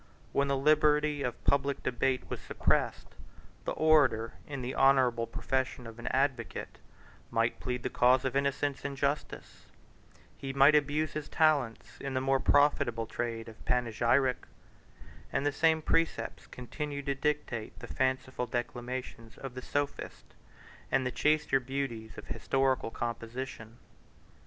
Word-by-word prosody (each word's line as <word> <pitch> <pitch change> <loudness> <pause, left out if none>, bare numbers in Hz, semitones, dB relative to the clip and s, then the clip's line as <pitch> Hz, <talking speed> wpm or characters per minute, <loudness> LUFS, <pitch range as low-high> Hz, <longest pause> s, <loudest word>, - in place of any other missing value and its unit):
When 140 0 +2
the 140 0 +1
liberty 150 0 +3
of 125 -3 -3
public 140 0 +1
debate 130 +1 0
was - - -5
suppressed, - - 0 0.5
the - - -1
orator, 140 -8 +3
in 140 -3 -5
the 125 - -3
honorable 130 -4 +4
profession 130 +1 -2
of 115 0 -10
an 120 - -7
advocate, 130 -4 -1 0.5
might - - 0
plead 125 -1 -3
the 125 - -1
cause 125 +2 +4
of 130 - -1
innocence 140 0 0
and 140 0 -4
justice; 140 +2 -3 0.7
he 135 -1 -5
might 140 +2 +6
abuse 150 +1 +2
his 150 -1 -5
talents 145 -8 +1
in 135 -1 -4
the - - +2
more 135 0 +2
profitable 125 -6 +3
trade 115 0 -4
of 115 -1 -12
panegyric; 125 +2 +1 0.8
and 140 - 0
the 145 - +3
same 160 +2 +2
precepts 165 +1 0
continued 140 +3 -5
to 140 - +1
dictate 140 -5 -2
the - - -8
fanciful 130 -1 -1
declamations 120 -1 -5
of 135 -2 -7
the 125 - -6
sophist, 145 +2 -4 0.6
and 130 0 +2
the 125 - 0
chaster 150 -1 +2
beauties 125 -4 -4
of - - -8
historical 135 -3 0
composition. 115 0 -5
135 Hz, 140 wpm, -31 LUFS, 120-140 Hz, 0.8 s, might